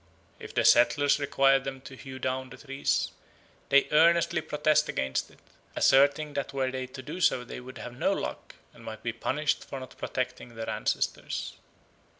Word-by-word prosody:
If - - -10
the - - +2
settlers 145 +4 +5
require 135 -1 +3
them 135 0 -6
to 135 0 -11
hew 130 0 -9
down 130 0 -3
the 130 - -11
trees, 135 -1 -1 0.6
they 140 0 +5
earnestly 165 +2 +4
protest 150 +1 +1
against 65 0 -1
it, - - -20 0.4
asserting 145 +2 +4
that 140 -1 -3
were 130 -1 0
they 130 0 -4
to 130 +1 -10
do 180 - -6
so 125 -7 +3
they 120 - -8
would 130 +1 -10
have 120 - -8
no - - +1
luck, - - -4 0.2
and - - -16
might 110 -1 -8
be 115 - -2
punished 150 +6 -1
for 135 - -7
not 130 - -10
protecting 120 - -4
their 115 0 -4
ancestors. - - -2
135 Hz, 175 wpm, -28 LUFS, 130-145 Hz, 0.6 s, settlers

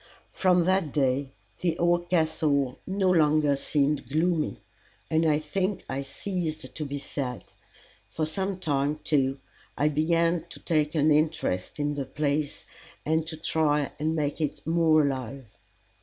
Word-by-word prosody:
From 180 -2 +3
that 185 -4 +1
day 135 -1 +1 0.3
the 170 -2 0
old 175 0 +1
Castle 155 -6 +1
no 190 -1 +2
longer 155 -3 +4
seemed 140 -2 0
gloomy, 160 +2 0 0.5
and 160 +1 +3
I 150 -1 +4
think 185 +6 -2
I 135 +1 -3
ceased 160 +3 -4
to 155 - -4
be 145 0 -4
sad; 135 -3 -4 0.7
for 155 - -2
some 190 +4 -2
time, 145 -4 0
too, 135 -3 +1 0.4
I 150 +1 +3
began 165 +2 +2
to - - -10
take 155 -2 0
an 155 0 +4
interest 150 - 0
in 145 0 0
the 140 -2 -3
place, 145 +2 -2 0.4
and 160 +1 +1
to 160 -1 -5
try 150 -2 +1
and 160 +2 0
make 150 0 -1
it 150 - -3
more 160 -1 +4
alive. 130 -1 -3
155 Hz, 145 wpm, -27 LUFS, 145-165 Hz, 0.7 s, longer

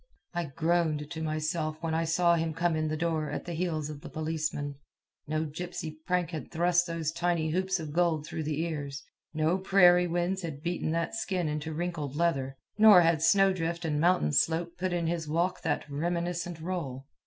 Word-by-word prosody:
I 175 -1 -1
groaned 160 0 0
to 160 -2 -5
myself 155 0 -2
when 165 -1 -2
I 165 +1 +1
saw 170 +1 +3
him 165 -2 0
come 170 0 +1
in 155 0 0
the 155 0 -2
door 160 -2 -1
at - - -4
the 175 - -4
heels 160 -3 -1
of 150 -1 -8
the - - -9
policeman. 155 -3 -3 0.5
No 155 +1 -1
gypsy 160 0 -5
prank 180 -2 +1
had 160 -3 -6
thrust 175 +1 +2
those 165 -2 -2
tiny 170 -2 0
hoops 190 +2 0
of 155 -2 -6
gold 165 -3 +1
through 155 0 -4
the 155 0 -1
ears; 145 -4 -4 0.3
no 160 +4 +1
prairie 180 -2 +5
winds 175 +3 -1
had 155 -4 -6
beaten 175 -2 -1
that 165 0 -1
skin 185 -6 -1
into 150 +1 -3
wrinkled 155 -4 -3
leather; 135 -5 0 0.2
nor 210 -4 +9
had 165 -2 +3
snow 195 +3 +5
drift 170 -1 -3
and 150 -2 0
mountain 170 - +3
slope 165 - +1
put 185 +1 -2
in 175 -1 0
his 165 -1 -2
walk 170 +4 0
that 155 -4 -1
reminiscent 170 +3 -2
roll. 155 -7 -4
165 Hz, 190 wpm, -29 LUFS, 155-175 Hz, 0.5 s, nor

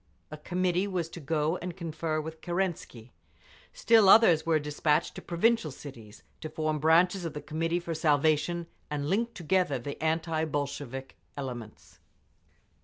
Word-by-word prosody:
a 155 - -6
committee 180 +4 0
was 180 -4 -2
to 170 - -9
go 155 +2 0
and 180 +1 -6
confer 160 -2 -3
with 160 +1 -7
Kerensky; 175 -10 -3 0.6
still 220 -3 +4
others 175 -8 +6
were 160 -1 +4
despatched 150 +1 0
to - - -8
provincial 180 +1 +1
cities, 125 -6 -11 0.2
to 155 - -6
form 155 -1 -2
branches 175 +5 +3
of 165 - -4
the - - -3
Committee 165 +2 -1
for 170 -1 -4
Salvation, 155 +2 +1 0.2
and 145 -1 -3
link 230 +4 0
together 175 -4 +1
the 140 +4 -7
anti 160 0 0
Bolshevik 140 -3 -4 0.2
elements. 120 -6 -8
160 Hz, 145 wpm, -29 LUFS, 150-175 Hz, 0.6 s, others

